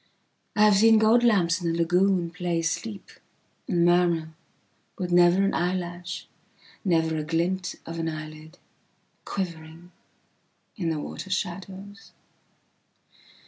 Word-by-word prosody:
I 210 - +4
have 210 -2 +6
seen 225 +2 +6
gold 220 +2 +4
lamps 185 -6 +3
in 170 - -1
a 165 - -1
lagoonplay 175 -1 +1
sleep 200 +4 -4 0.6
and 175 -6 +2
murmurwith 175 +1 -2
never 175 +2 +5
an 195 - +1
eyelash, 175 0 -3 0.6
never 160 -4 +1
a 155 - -2
glint 175 +4 -1
of 165 0 -6
an 165 0 -1
eyelid, 155 +1 -9 0.7
quivering 170 -2 -6 0.8
in 175 -6 -2
the 160 - -1
water 190 - -7
shadows. 195 +2 -5
175 Hz, 110 wpm, -26 LUFS, 165-195 Hz, 0.8 s, have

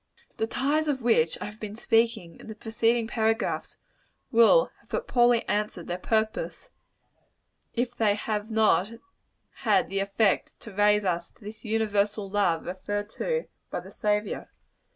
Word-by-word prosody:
The 220 - 0
ties 290 +6 0
of 270 -4 -1
which 170 -9 +3
I - - -3
have 210 +1 -9
been 210 -1 -6
speaking, 225 -7 +1
in - - -12
the 220 - -7
preceding 225 +1 +1
paragraphs, 225 0 -1 0.5
will 235 - +5
have - - -29
but 480 - -3
poorly 240 -1 +3
answered 210 -4 -1
their 175 +1 -4
purpose, 220 - -1 1.0
if 240 0 -1
they 210 -2 +2
have 210 0 -3
not 220 -1 +3 0.6
had - - +2
the 195 - -1
effect 200 +1 +1
to 220 - -9
raise 210 +1 +3
us 170 -2 -1
to 230 - -23
this 210 +1 -9
universal 210 -2 0
love 195 -5 +1
referred 205 +3 -4
to 480 0 -2 0.2
by - - -3
the - - -12
Saviour. 210 -1 -1
220 Hz, 150 wpm, -27 LUFS, 205-230 Hz, 1.0 s, will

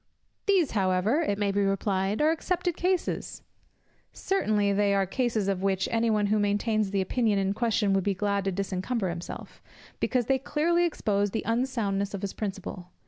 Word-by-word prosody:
"These 375 -8 +3
however," 195 - +2
it 205 -11 0
may 205 -1 +1
be 200 +1 +1
replied, 195 +3 0
"are 310 - +4
excepted 350 +1 -1
cases." 365 0 -1 0.7
Certainly 210 - +1
they 200 0 +2
are 195 -1 +2
cases 225 0 -1
of 195 -2 0
which 195 -1 +1
any 230 0 +2
one 210 -1 +2
who 210 +1 +2
maintains 205 +1 +1
the 195 0 0
opinion 215 +1 +1
in 195 0 +1
question 215 -2 +1
would 195 -1 +2
be 200 0 0
glad 200 0 0
to 195 - +1
disencumber 195 +2 -2
himself; 170 0 -7 0.4
because 250 -2 +1
they 265 +2 +2
clearly 340 +6 +1
expose 205 -11 0
the 220 - -3
unsoundness 225 -5 -1
of 200 - -7
his 200 - -3
principle. 195 -3 -5
205 Hz, 175 wpm, -27 LUFS, 195-240 Hz, 0.7 s, are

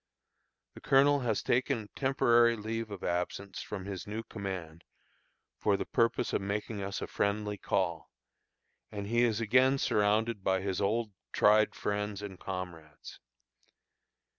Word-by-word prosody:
The - - -12
colonel 140 +1 +4
has 115 -5 -1
taken 125 -1 +1
a - - -13
temporary 120 -3 +3
leave 115 +1 -4
of 100 -3 -8
absence 90 +3 -3
from 95 -3 -6
his 100 -1 -6
new 110 +2 -4
command 90 -7 -6 0.8
for 100 -2 +2
the - - -3
purpose 115 -1 +1
of - - +1
making 100 +1 -3
us 100 0 -4
a - - -1
friendly 105 0 -1
call; 85 -4 -1 0.8
and 100 -1 -5
he 120 +3 +1
is 115 -2 +2
again 125 +4 +4
surrounded 105 -2 +1
by 95 0 +1
his 95 -1 -2
old 110 +2 0 0.2
tried 105 +1 +4
friends 105 0 -3
and 95 -3 -7
comrades. 85 -5 -7
105 Hz, 140 wpm, -31 LUFS, 95-115 Hz, 0.8 s, colonel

